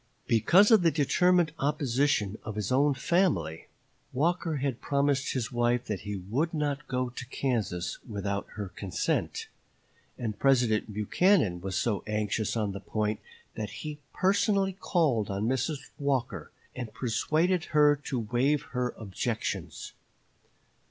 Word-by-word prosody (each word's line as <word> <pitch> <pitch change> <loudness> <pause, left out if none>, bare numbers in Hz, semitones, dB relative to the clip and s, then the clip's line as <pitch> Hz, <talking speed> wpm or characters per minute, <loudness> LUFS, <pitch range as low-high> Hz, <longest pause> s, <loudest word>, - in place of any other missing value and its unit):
Because 175 - +5
of 220 -4 +7
the 170 - +5
determined 170 +3 +3
opposition 135 -6 +1
of 110 - -6
his 105 0 -2
own 140 +2 +3
family, 150 - 0 0.5
Walker 165 +3 0
had 135 -3 -2
promised 140 -1 +1
his 125 -4 -2
wife 120 0 +1
that 105 -3 -3
he 105 +2 -5
would 125 - -2
not 150 0 -2
go 125 -1 -1
to 125 +1 -7
Kansas 115 -10 -2
without 100 -2 -3
her 100 -3 -4
consent; 95 -1 -2 0.7
and 110 -4 -4
President 120 -6 +2
Buchanan 105 - +2
was 95 +1 -3
so 105 -2 0
anxious 105 +1 -1
on 105 -2 0
the 100 - -6
point 105 +1 -2 0.3
that 105 -1 -4 0.2
he 150 -1 -5
personally 195 0 +2
called 155 - +1
on 100 +3 -1
Mrs. 135 +3 -2
Walker 135 -3 -1 0.3
and 120 -4 -5
persuaded 155 +9 +1
her 150 -1 +4
to 130 -5 -1
waive 125 +6 +1
her 125 -1 -1
objections. 100 -5 -4
125 Hz, 135 wpm, -29 LUFS, 105-150 Hz, 0.7 s, of